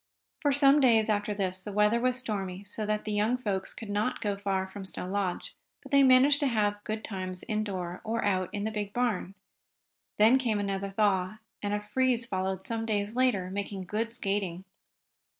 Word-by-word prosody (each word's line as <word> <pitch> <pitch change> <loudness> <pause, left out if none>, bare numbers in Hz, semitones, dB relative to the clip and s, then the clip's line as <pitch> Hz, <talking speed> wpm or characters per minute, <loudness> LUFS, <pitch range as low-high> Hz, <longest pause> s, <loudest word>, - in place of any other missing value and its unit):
For 290 - +3
some 280 +1 +6
days 225 -5 +4
after 210 0 0
this 190 -2 -1
the 205 - -7
weather 210 +3 +3
was 255 0 +2
stormy, 200 -6 -4
so 210 +1 -3
that 210 0 -1
the 215 - -3
young 210 +4 +1
folks 200 -6 -3
could 220 -3 -8
not 210 +4 0
go 205 -2 -1
far 195 -1 -1
from 195 +1 -8
Snow 185 -1 -5
Lodge. 190 -2 -2 0.3
But - - -12
they 280 -1 +6
managed 270 +2 +6
to 285 - +2
have 205 -4 0
good 215 0 -3
times 185 -2 -5
indoors, 190 -5 -3
or 225 0 -1
out 185 -3 +1
in 205 -1 -3
the 220 - -1
big 205 -2 -4
barn. 215 -6 -1 0.8
Then 225 +5 +6
came 225 -5 0
another 200 -1 -2
thaw, 195 -1 +1 0.2
and 205 - -2
a - - -1
freeze 255 -2 +2
followed 190 -2 -3
some 225 -1 -2
days 210 0 -1
later, 240 -8 +1
making 200 -1 -4
good 220 +5 -2
skating. 195 -5 -2
210 Hz, 190 wpm, -29 LUFS, 195-230 Hz, 0.8 s, some